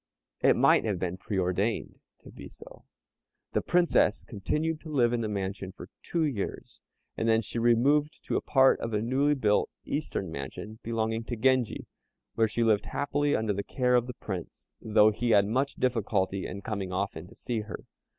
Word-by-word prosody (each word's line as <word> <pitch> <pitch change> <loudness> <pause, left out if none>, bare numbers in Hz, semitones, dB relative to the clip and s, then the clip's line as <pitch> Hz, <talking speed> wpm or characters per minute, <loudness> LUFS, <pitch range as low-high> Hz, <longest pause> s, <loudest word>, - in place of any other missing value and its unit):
it - - +5
might - - +4
have 105 -4 -1
been 90 0 -2
preordained 95 +2 -2 0.2
to - - -12
be - - -10
so. - - -15 0.7
The - - +1
Princess 175 -10 +2
continued 155 +10 -2
to 160 - -10
live 120 -5 +2
in 120 - 0
the 110 - -1
mansion 95 -2 -4
for 95 - -11
two 170 -2 -1
years, 125 -10 -4 0.3
and 115 - 0
then 110 0 +3
she 115 - -4
removed 135 +6 +2
to - - -2
a - - +1
part 135 -1 +4
of 115 -1 -3
a 105 - +1
newly 140 +5 +2
built 105 -6 +2 0.2
"eastern 120 - -3
mansion" 80 +10 -7
belonging 115 0 -2
to 120 - -4
Genji, 130 0 +1 0.5
where 110 -1 +2
she 115 +2 -1
lived 110 -3 +2
happily 145 +1 0
under 110 -1 0
the 100 - -2
kind - - -18
care 125 -1 +3
of 120 0 +2
the 125 - -6
Prince, 95 -5 -7
though 110 -1 +4
he 120 +3 -2
had 100 -3 +5
much 130 +7 0
difficulty 100 -6 0
in 100 +2 -7
coming 100 -4 -3
often 90 -3 -3
to 115 - -16
see 120 -1 -3
her. 105 0 -7
110 Hz, 190 wpm, -28 LUFS, 100-130 Hz, 0.7 s, it